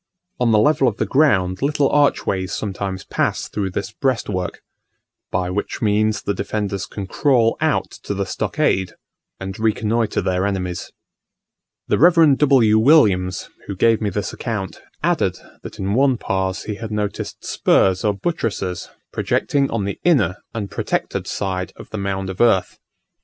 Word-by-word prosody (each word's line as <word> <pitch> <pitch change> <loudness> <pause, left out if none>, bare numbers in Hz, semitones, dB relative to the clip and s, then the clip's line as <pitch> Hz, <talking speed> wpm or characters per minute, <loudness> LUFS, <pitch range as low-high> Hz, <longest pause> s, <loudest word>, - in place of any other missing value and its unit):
On 120 -2 +3
the 110 - +5
level 135 +4 +4
of 115 -3 -1
the - - 0
ground 95 -11 +2
little 145 0 +2
archways 100 -10 +1
sometimes 95 -2 -4
pass - - -1
through 100 -2 -3
this 100 +3 -4
breastwork, 105 -8 -2 0.7
by 90 0 -1
which 100 +3 -3
means 110 0 +1
the 100 - -1
defenders 100 +1 -3
can 100 -5 -6
crawl 115 +2 +2
out - - +1
to 100 - -4
the 100 0 -1
stockade 95 0 0 0.5
and 95 +1 -6
reconnoitre 110 0 0
their 95 +1 0
enemies. 90 -3 -3 1.0
The - - +1
Rev. 165 -2 +6
W. 130 -7 +4
Williams, 100 - +3 0.2
who 100 - -4
gave 115 +4 +3
me 105 - 0
this 100 +2 -3
account, 105 -6 -4 0.2
added, - - +1 0.2
that - - -9
in 95 +1 -2
one 130 +1 +3
Pas 95 -2 -2
he 105 - -4
had 110 - -4
noticed 105 -1 -4
spurs 95 -1 +2
or 105 -1 +1
buttresses 100 - -3 0.2
projecting 140 -1 0
on 115 -3 -1
the 100 - -4
inner 105 - +3
and 105 -4 -5
protected - - -2
side 95 -2 -3
of - - -13
the 110 - -4
mound 95 -1 -2
of 95 - -5
earth. 115 -6 +2
105 Hz, 155 wpm, -20 LUFS, 95-115 Hz, 1.0 s, Rev